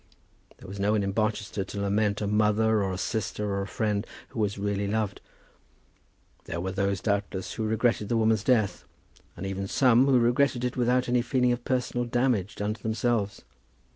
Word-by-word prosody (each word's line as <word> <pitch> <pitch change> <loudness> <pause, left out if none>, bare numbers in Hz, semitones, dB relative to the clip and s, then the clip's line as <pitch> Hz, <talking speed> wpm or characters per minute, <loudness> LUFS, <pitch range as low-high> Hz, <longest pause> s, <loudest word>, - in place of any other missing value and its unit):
There - - -13
was 100 +2 -8
no 100 +2 +2
one 105 -2 +1
in 100 - -1
Barchester 105 -1 -1
to 100 +1 -7
lament 100 +1 +1
a - - 0
mother, 105 +1 +2
or 95 -1 -1
a 95 - -3
sister, 105 0 -2
or 100 0 -1
a 100 - -4
friend 105 0 -1 0.2
who - - -7
was 100 -2 0
really 100 0 -1
loved. 105 -1 -2 1.2
There 85 - -4
were 95 +2 -2
those, 100 0 -1
doubtless, 100 -3 -2
who 110 - -2
regretted 110 -1 +1
the 115 - +2
woman's 110 -2 +2
death, 110 -5 +1 0.5
and - - -5
even 95 0 -3
some 125 +3 +4
who 135 -2 +5
regretted 120 +1 +2
it 125 - -2
without 125 +1 +2
any 125 0 +2
feeling 125 0 +1
of 120 0 -2
personal 125 -1 -1
damage 120 -4 0
done 105 +1 -2
to 110 - -14
themselves. 110 -2 -1
110 Hz, 190 wpm, -27 LUFS, 100-120 Hz, 1.2 s, who